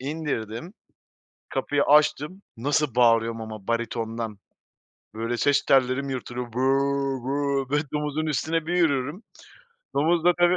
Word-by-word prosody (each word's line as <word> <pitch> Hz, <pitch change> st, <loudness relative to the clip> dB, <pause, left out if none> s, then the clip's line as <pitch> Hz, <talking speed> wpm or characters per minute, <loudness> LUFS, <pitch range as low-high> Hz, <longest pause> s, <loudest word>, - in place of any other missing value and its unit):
indirdim, 140 Hz, -, -4 dB, 0.8 s
kapıyı 145 Hz, 0 st, 0 dB
açtım, 150 Hz, +4 st, +3 dB, 0.2 s
nasıl 145 Hz, +1 st, 0 dB
bağırıyorum 115 Hz, -2 st, +3 dB
ama 110 Hz, -3 st, -8 dB
baritondan. 115 Hz, -2 st, -2 dB, 0.7 s
Böyle 115 Hz, +2 st, -2 dB
ses 140 Hz, +4 st, +2 dB
tellerim 135 Hz, +1 st, +3 dB
yırtılıyor. 125 Hz, -2 st, -5 dB
"Bö 125 Hz, -, -3 dB, 0.6 s
bö 140 Hz, 0 st, -1 dB
bö" 145 Hz, +1 st, +2 dB
domuzun 150 Hz, +1 st, -1 dB
üstüne 160 Hz, +2 st, -1 dB
bir 175 Hz, -, -1 dB
yürürüm. 150 Hz, -, +1 dB, 0.7 s
Domuz 165 Hz, +3 st, +2 dB
da 175 Hz, -, +6 dB
tabii 175 Hz, +1 st, +4 dB
140 Hz, 120 wpm, -25 LUFS, 115-150 Hz, 0.8 s, da